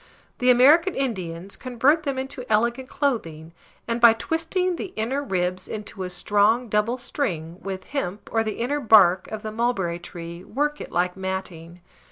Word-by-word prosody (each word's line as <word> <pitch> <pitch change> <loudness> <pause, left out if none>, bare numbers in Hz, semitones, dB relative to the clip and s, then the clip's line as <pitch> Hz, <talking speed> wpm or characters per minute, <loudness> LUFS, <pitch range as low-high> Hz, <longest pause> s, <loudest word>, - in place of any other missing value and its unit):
The 250 - +3
American 300 +9 +6
Indians 190 -8 -3
convert 260 +5 +2
then 275 -3 -3
into 265 0 -4
an 250 - -11
elegant 235 +4 +1
clothing, 165 - -2 0.3
and, 235 0 -2
by 235 -1 +9
twisting 330 +9 -1
the 370 - -6
inner 245 +6 -1
ribs 185 -5 -2
into 210 -2 -7
a 185 - -3
strong 210 +6 +2
double 210 +4 +1
string, 180 - -4
with 190 -1 -5
hemp 210 -8 -4
or 225 -1 +2
the 215 -1 -4
inner 275 +5 -1
bark 195 -7 +5
of 215 -1 -6
the 215 - -4
mulberry 215 -7 -1
tree, 170 0 -9
work 295 +7 -2
it - - -8
like 180 +1 0
matting. 185 -3 -6
220 Hz, 170 wpm, -24 LUFS, 185-260 Hz, 0.3 s, by